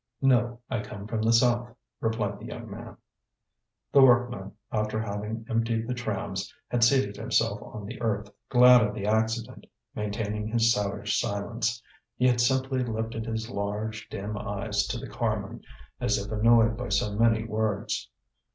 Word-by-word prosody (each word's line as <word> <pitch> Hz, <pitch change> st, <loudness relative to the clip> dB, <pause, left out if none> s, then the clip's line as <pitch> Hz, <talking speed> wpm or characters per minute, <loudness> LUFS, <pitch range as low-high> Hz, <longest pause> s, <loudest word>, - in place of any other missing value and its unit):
"No, 120 Hz, -2 st, +3 dB
I 130 Hz, -4 st, -2 dB
come 100 Hz, -1 st, -8 dB
from 110 Hz, 0 st, -2 dB
the 110 Hz, +1 st, +3 dB
South," 120 Hz, 0 st, +3 dB, 0.2 s
replied 110 Hz, -3 st, -1 dB
the 110 Hz, -, -9 dB
young 115 Hz, -3 st, -8 dB
man. 115 Hz, +3 st, -9 dB, 0.9 s
The 140 Hz, -, +7 dB
workman, 120 Hz, -6 st, +4 dB, 0.2 s
after 110 Hz, 0 st, -1 dB
having 110 Hz, +1 st, -4 dB
emptied 115 Hz, -1 st, 0 dB
the 125 Hz, -, -1 dB
trams, 120 Hz, -4 st, -3 dB, 0.2 s
had 120 Hz, -1 st, +2 dB
seated 115 Hz, -5 st, +3 dB
himself -, -, 0 dB
on 105 Hz, -2 st, -8 dB
the 120 Hz, +3 st, -8 dB
earth, 105 Hz, -3 st, -1 dB, 0.2 s
glad 125 Hz, -1 st, +8 dB
of 105 Hz, -1 st, 0 dB
the 100 Hz, -2 st, -4 dB
accident, 110 Hz, +1 st, -1 dB, 0.3 s
maintaining 105 Hz, 0 st, -3 dB
his 115 Hz, +1 st, +3 dB
savage 105 Hz, -3 st, -1 dB
silence; 115 Hz, +3 st, -2 dB, 0.3 s
he 125 Hz, -, +1 dB
had 120 Hz, -1 st, +3 dB
simply 130 Hz, +1 st, +1 dB
lifted 115 Hz, -1 st, -3 dB
his 110 Hz, 0 st, -3 dB
large, 105 Hz, +1 st, -4 dB
dim 105 Hz, +1 st, -4 dB
eyes 100 Hz, 0 st, -1 dB
to -, -, -2 dB
the -, -, -7 dB
carman, -, -, -3 dB, 0.4 s
as 105 Hz, -, +1 dB
if 100 Hz, +1 st, -5 dB
annoyed 115 Hz, +1 st, +4 dB
by 125 Hz, +1 st, -4 dB
so 100 Hz, +1 st, +1 dB
many 110 Hz, 0 st, +3 dB
words. 110 Hz, -2 st, -2 dB
110 Hz, 160 wpm, -27 LUFS, 105-120 Hz, 0.9 s, glad